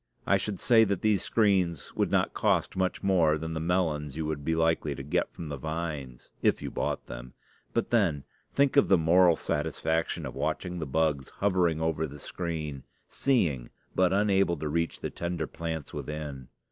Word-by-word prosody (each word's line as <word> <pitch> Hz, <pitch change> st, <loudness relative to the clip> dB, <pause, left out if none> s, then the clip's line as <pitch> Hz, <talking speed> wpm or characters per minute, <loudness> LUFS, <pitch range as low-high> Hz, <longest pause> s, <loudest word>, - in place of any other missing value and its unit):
I 100 Hz, -, +4 dB
should 100 Hz, -1 st, -3 dB
say 115 Hz, -3 st, +5 dB
that 100 Hz, -3 st, -2 dB
these 105 Hz, -3 st, +3 dB
screens 95 Hz, -9 st, +1 dB
would -, -, +1 dB
not -, -, +1 dB
cost -, -, +1 dB
much 95 Hz, +1 st, -1 dB
more 85 Hz, -6 st, +3 dB
than 80 Hz, +1 st, -5 dB
the 80 Hz, -, -2 dB
melons 80 Hz, -4 st, 0 dB
you 80 Hz, -, -2 dB
would 75 Hz, -2 st, -3 dB
be 80 Hz, +2 st, 0 dB
likely 80 Hz, -3 st, +1 dB
to 70 Hz, -, -7 dB
get 75 Hz, -, 0 dB
from 80 Hz, -, -8 dB
the 70 Hz, -, -4 dB
vines 75 Hz, -4 st, -5 dB
if -, -, +3 dB
you -, -, -5 dB
bought -, -, -2 dB
them; -, -, -9 dB, 0.4 s
but 115 Hz, -, -1 dB
then, 90 Hz, -12 st, +2 dB, 0.3 s
think 140 Hz, 0 st, +3 dB
of 140 Hz, -, +6 dB
the 95 Hz, -, +5 dB
moral 85 Hz, +1 st, +5 dB
satisfaction 80 Hz, +2 st, -1 dB
of -, -, -5 dB
watching 90 Hz, -1 st, -2 dB
the 80 Hz, -, -3 dB
bugs 75 Hz, -2 st, 0 dB
hovering 90 Hz, -5 st, +2 dB
over 80 Hz, -1 st, 0 dB
the 75 Hz, +1 st, -10 dB
screen, 75 Hz, -3 st, -4 dB, 0.3 s
seeing 80 Hz, -, +1 dB, 0.2 s
but 90 Hz, -1 st, +3 dB
unable 100 Hz, -3 st, +2 dB
to 75 Hz, -, -3 dB
reach 85 Hz, +2 st, -1 dB
the -, -, -3 dB
tender 85 Hz, 0 st, -3 dB
plants 80 Hz, -3 st, -5 dB
within. 75 Hz, -4 st, -5 dB
80 Hz, 185 wpm, -28 LUFS, 75-95 Hz, 0.4 s, of